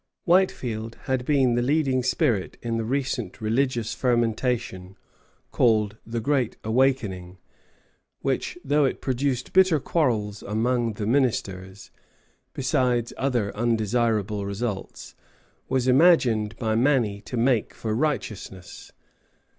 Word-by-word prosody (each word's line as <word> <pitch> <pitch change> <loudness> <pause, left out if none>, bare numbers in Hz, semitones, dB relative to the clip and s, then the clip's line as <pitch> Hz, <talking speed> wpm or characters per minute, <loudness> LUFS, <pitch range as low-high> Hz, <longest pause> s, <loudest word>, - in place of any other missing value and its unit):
Whitefield 125 - +1
had 130 -2 -1
been 135 -4 +3
the 120 - +1
leading 135 -1 +1
spirit 125 - 0
in 115 -1 -1
the 115 - -1
recent 135 +4 -2
religious 115 +1 0
fermentation 120 -5 -1 0.5
called 110 -3 +2
the 115 +1 -3
Great 130 0 0
Awakening, 110 -7 0 0.8
which, 135 +5 -2
though 145 +2 +3
it 135 - 0
produced 130 -1 -2
bitter 185 -4 +5
quarrels 115 -10 -1
among 115 +2 0
the 105 0 -4
ministers, 100 -6 -1 0.6
besides 125 -3 0
other 120 -7 -1
undesirable 110 -2 0
results, 100 0 -5 0.6
was 130 -1 0
imagined 125 -7 +4
by 110 -2 -1
many 115 -4 +1
to 125 - -6
make 120 -2 +2
for 110 -1 -4
righteousness. 110 - -4
120 Hz, 110 wpm, -25 LUFS, 110-130 Hz, 0.8 s, bitter